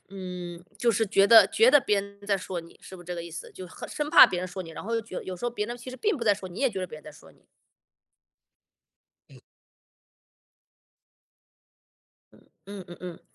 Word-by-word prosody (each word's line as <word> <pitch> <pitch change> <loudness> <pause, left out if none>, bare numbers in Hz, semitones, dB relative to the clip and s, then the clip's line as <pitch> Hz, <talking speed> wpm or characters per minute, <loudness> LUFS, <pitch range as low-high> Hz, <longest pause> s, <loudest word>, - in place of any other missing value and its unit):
嗯， 180 -3 -7 0.2
就 235 +2 +2
是 225 0 +1
觉 195 0 +4
得 220 -3 +8
觉 225 +5 +4
得 290 - +7
别 210 -4 +1
人 200 0 -12
在 200 -1 +2
说 185 -2 -5
你， 165 - -16
是 190 - -11
不 175 - -13
是 - - -22
这 180 - -4
个 170 - -5
意 170 - -9
思？ 170 - -8
就 185 - -9
很 - - -10
生 295 0 -4
怕 - - +10
别 180 -1 -3
人 185 - -3
说 185 +1 -6
你， 165 - -10
然 - - -8
后 230 - -2
又 - - 0
觉 225 -3 -12
得 - - -4
有 185 -1 -6
时 175 - -8
候 240 - 0
别 220 -3 -3
人 240 - -6
其 240 - -11
实 255 - -9
并 425 -1 0
不 235 - -5
在 205 -2 +4
说 190 -2 -9
你， 175 - -12
你 - - -5
也 265 - +4
觉 195 -3 -5
得 185 - -3
别 155 - -10
人 - - -15
在 155 - -10
说 - - -17
你。 - - -29 1.8
嗯。 - - -16 2.9
嗯， - - -21 0.3
嗯 200 -2 -8
嗯 175 - -10
嗯， 180 -2 -8
195 Hz, 260 characters per minute, -27 LUFS, 180-225 Hz, 2.9 s, 怕